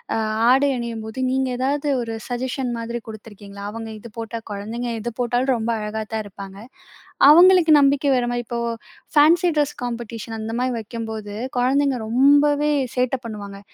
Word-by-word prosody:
அ - - 0 0.3
ஆடை 275 +2 +4
அணியும்போது 230 0 -5
நீங்க 265 0 0
ஏதாவது 280 +3 -1
ஒரு 230 -1 -4
சஜஷன் 250 0 -3
மாதிரி 235 +1 -4
குடுத்திருக்கீங்களா? 205 -2 -10
அவங்க 225 0 -7
இது 235 - -11
போட்டா 230 0 -5
குழந்தைக 230 +4 -4
எத 240 +2 -4
போட்டாலும் 245 +2 +1
ரொம்ப 225 +1 -3
அழகாதான் 215 +1 -4
இருப்பாங்க. 195 -1 -10 0.7
அவங்களுக்கு 345 0 +7
நம்பிக்கை 280 0 +3
வர 245 -1 0
மாரி, 240 0 -2
இப்போ 235 0 -3 0.6
ஃபேன்ஸி 335 +4 +5
டிரஸ் 295 0 +1
காம்பெடிஷன் 230 -2 -5
அந்த 220 +1 -5
மாரி 255 0 0
வைக்கும்போது 220 -2 -6 0.2
கொழந்தைங்க 270 0 +2
ரொம்பவே 290 +4 +4 0.2
சேட்ட 250 +1 +1
பண்ணுவாங்க. 200 -3 -7
240 Hz, 145 wpm, -22 LUFS, 220-270 Hz, 0.7 s, அவங்களுக்கு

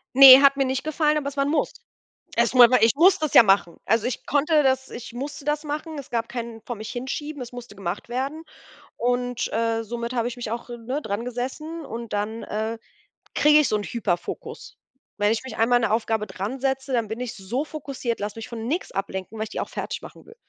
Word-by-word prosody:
Ne, 270 0 +11
hat 275 0 +6
mir 275 - +2
nicht 260 0 -1
gefallen, 305 0 +1
aber 280 -2 -2
es 285 0 -6
war 275 - +3
'n - - -1
Muss. 320 - 0 0.6
Es - - +2
ma 245 -2 +9
war 250 -4 +4
ich 225 +2 +5
muss 375 +4 +6
das 310 -3 -2
ja - - +11
machen. 195 -5 +2
Also, 225 +1 +2
ich 255 - -4
konnte 300 +1 +3
das 265 0 +1
ich 235 0 -8
musste 280 +3 -6
das 300 +1 -1
machen. 300 +1 -4
Es 275 - -8
gab 230 -1 -1
keinen 230 -2 -6
vor 240 - -6
mich 215 +1 -7
hinschieben, 275 +3 -5
es 240 - -9
musste 240 -4 -10
gemacht 195 +2 -5
werden 270 +6 -3 0.6
und, 245 0 -1
äh, 225 0 0
somit 235 +1 -4
habe 235 -1 0
ich 245 - -5
mich 235 -3 -5
auch, 235 +1 -4
ne, 240 +5 -4
drangesessen 250 +9 -4
und 235 -2 -7
dann, 210 +2 -2
äh, 220 +2 -3 0.6
kriege 300 0 +6
ich 300 - +3
so 215 - +1
'nen 205 - -4
Hyperfokus. 185 -7 -4 0.4
Wenn 205 +1 +2
ich 225 - -1
mich 260 - -8
einmal 235 +2 +4
an 240 - -1
'ne 220 - +1
Aufgabe 220 -1 0
dransetze, 265 +6 -3
dann 230 -3 +1
bin 220 +2 -5
ich 250 -2 -4
so 220 +8 -3
fokussiert, 275 -6 -4
lass 205 +1 -4
mich 225 - -8
von 225 -1 -6
nix 330 +8 -2
ablenken, 195 +2 -4
weil 215 - -2
ich 220 - -7
die - - -4
auch - - -5
fertigmachen - - -7
will. 455 - -15
245 Hz, 225 wpm, -24 LUFS, 225-275 Hz, 0.6 s, Ne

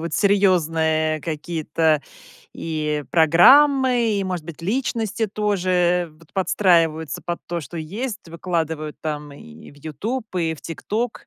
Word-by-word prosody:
вот 165 -1 -5
серьезные 160 -6 +2
какие-то 155 -1 -1 0.5
и 150 -2 -3
программы, 245 - +5
и, 195 - -1
может 180 -4 -3
быть, 170 0 -9
личности 225 +1 -1
тоже 180 -5 0
вот 165 -1 -22
подстраиваются 165 -5 +1
под 175 0 -3
то, 170 -1 -3
что 150 +4 -9
есть, 205 +6 -5
выкладывают 160 -3 -3
там 150 -2 -5
и 80 - -13
в 145 - -19
"Ютуб", 205 - -4
и 165 -2 0
в 155 - -15
"Тикток", 220 +8 -4
170 Hz, 130 wpm, -22 LUFS, 155-205 Hz, 0.5 s, программы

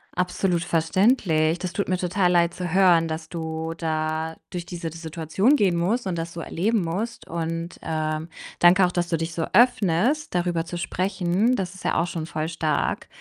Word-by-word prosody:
Absolut 180 -1 0
verständlich. 165 -2 +2
Das 180 -1 -3
tut 200 - -1
mir 185 - +1
total 180 0 +1
leid 170 -1 +3
zu 180 -1 -4
hören, 175 -4 +5
dass 160 0 -5
du 160 -1 -4
da 160 0 -2
durch 175 -2 -5
diese 170 -2 -5
d 165 - -10
Situation 165 - +1
gehen 190 -9 +2
musst 200 +7 0
und 180 -2 -2
das 165 +1 -4
so 170 - -6
erleben 210 +7 0
musst 205 +8 -4
und, 165 +1 -4
ähm, 155 0 -2 0.3
danke 180 +2 +6
auch, 180 - -1
dass 175 -1 -1
du 165 - +1
dich 165 +1 -4
so 165 -1 -1
öffnest, 240 - +3
darüber 175 -1 0
zu 175 - -5
sprechen. 185 +5 0
Das 190 -4 -3
ist 190 - -12
ja - - 0
auch 170 - +1
schon 165 -2 -4
voll 155 0 -3
stark. 160 -2 -1
175 Hz, 190 wpm, -24 LUFS, 165-185 Hz, 0.3 s, danke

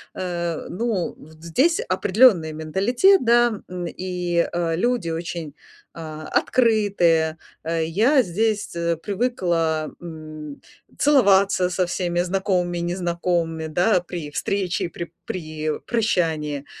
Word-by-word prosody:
э, 175 -3 -3
ну, 210 -2 -2 0.2
здесь 265 - +1
определённый 190 -7 +4
менталитет, 230 - +3
да. 235 -2 +3
М, 180 -1 -5
и, 180 -1 -1
э, 170 -1 -1
люди 235 -1 0
очень, 165 -2 -5 0.4
э, 155 -2 -7
открытые. 195 -9 +2 0.3
Э, 165 0 -1
я 225 - +3
здесь 215 +1 0 0.4
привыкла 175 -8 0
м, 155 -3 -9 0.4
целоваться 200 -9 +4
со 180 0 +1
всеми 175 -1 -1
знакомыми 180 -1 0
и 170 - -2
незнакомыми, 170 -2 -1
да, 180 +5 +2
при 170 -4 -6
встрече 190 +3 -1
и - - -2
при 170 -1 -7
при 155 -3 -4
прощании. 160 - 0
175 Hz, 110 wpm, -23 LUFS, 165-205 Hz, 0.4 s, определённый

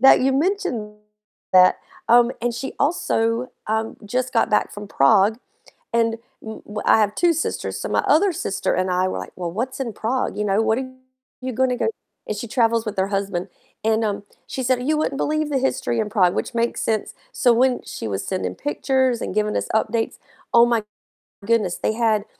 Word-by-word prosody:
that 270 - +7
you 265 +1 +2
mentioned 275 - -1 0.6
that. 185 0 +6 0.3
Um, 240 +1 +6
and 240 0 -1
she 240 +3 -5
also, 235 -6 +1 0.2
um, 220 +1 -1
just 255 +4 -2
got 225 - +2
back - - +1
from 205 0 -8
Prague, 200 - +4 0.6
and 230 -1 +2 0.2
w 220 0 -8
w 210 0 -5
I - - +5
have 210 -1 +1
2 345 -1 +3
sisters, 320 - -3
so - - -3
my - - +1
other 365 +4 +4
sister 195 - -1
and 185 0 0
I 185 +1 +2
were 140 - -3
like, 90 - -8
"Well, 175 -2 -3
what's 245 +9 -3
in 240 -5 -3
Prague?" 250 +5 -2
You 210 - 0
know, 200 +2 +2
"What 220 +1 +2
are 260 -1 -5 0.5
you 255 -1 -4
gonna 255 0 +1
go" - - 0 0.4
and 210 - -2
she 225 - -4
travels 230 -1 +2
with 210 -1 -4
her 190 0 +1
husband, 195 -2 -2 0.4
and, 225 0 +2
um, 205 -2 -2 0.2
she 260 - -4
said, 250 0 +1
"You 310 0 +2
wouldn't 280 -2 -1
believe 310 +1 0
the 280 - +1
history 260 -3 0
in 210 -1 -1
Prague," 185 -5 +3
which - - -3
makes 235 0 0
sense. 220 -1 -1 0.2
So 255 - +3
when 250 +2 +2
she - - -6
was 100 -2 -3
sending 185 -1 -2
pictures 260 -4 0
and - - -3
giving 210 0 0
us - - -2
updates, 220 +1 0 0.4
oh 235 0 +7
my 235 -2 +1 0.6
goodness, 215 -6 +1
they - - 0
had 220 -2 +1
230 Hz, 200 wpm, -22 LUFS, 210-255 Hz, 0.6 s, that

